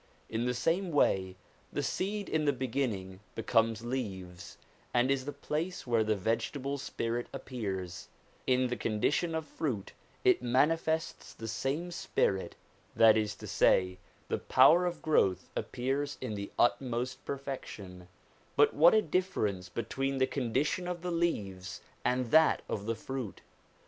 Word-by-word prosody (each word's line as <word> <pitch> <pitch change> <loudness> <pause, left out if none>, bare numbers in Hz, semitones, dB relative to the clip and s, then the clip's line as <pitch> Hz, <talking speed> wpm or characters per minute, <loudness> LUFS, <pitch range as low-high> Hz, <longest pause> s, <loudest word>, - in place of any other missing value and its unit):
In 115 +2 -1
the 125 0 0
same 165 +9 +1
way 95 - +2 0.4
the - - -2
seed 200 +2 -2
in 155 -1 0
the 145 - +3
beginning 115 -8 -2 0.2
becomes 115 -1 +1
leaves, 95 -8 -5 0.4
and 125 +2 +4
is 135 -1 0
the 145 - -3
place 155 +5 -3
where 115 -3 +2
the 110 0 +1
vegetable 115 +7 -1
spirit 120 -2 -3
appears; 100 -10 -5 0.4
in 130 0 +3
the 125 - -1
condition 125 +11 0
of 160 -1 -2
fruit 125 -12 -3 0.3
it - - +4
manifests 160 +6 +1
the 115 - -7
same 135 +10 -2
spirit, 95 - 0 0.4
that 115 -1 +7
is 105 -1 0
to - - -10
say, 90 0 +3 0.3
the - - -1
power 165 +8 +6
of 175 -2 -5
growth 95 - +2
appears 140 +3 -2
in 125 -4 -4
the 100 -1 -5
utmost 125 0 +1
perfection: 105 -10 -6 0.5
but - - +5
what 170 +7 +7
a 215 - +4
difference 110 - -1
between 135 +6 -2
the 130 - +4
con 130 -4 -3
dition 175 +8 0
of 175 -1 -4
the 180 - -2
leaves 100 - -2 0.2
and 125 -1 0
that 160 0 +5
of 105 0 -4
the 115 - 0
fruit 130 -4 -5
125 Hz, 150 wpm, -31 LUFS, 110-150 Hz, 0.5 s, that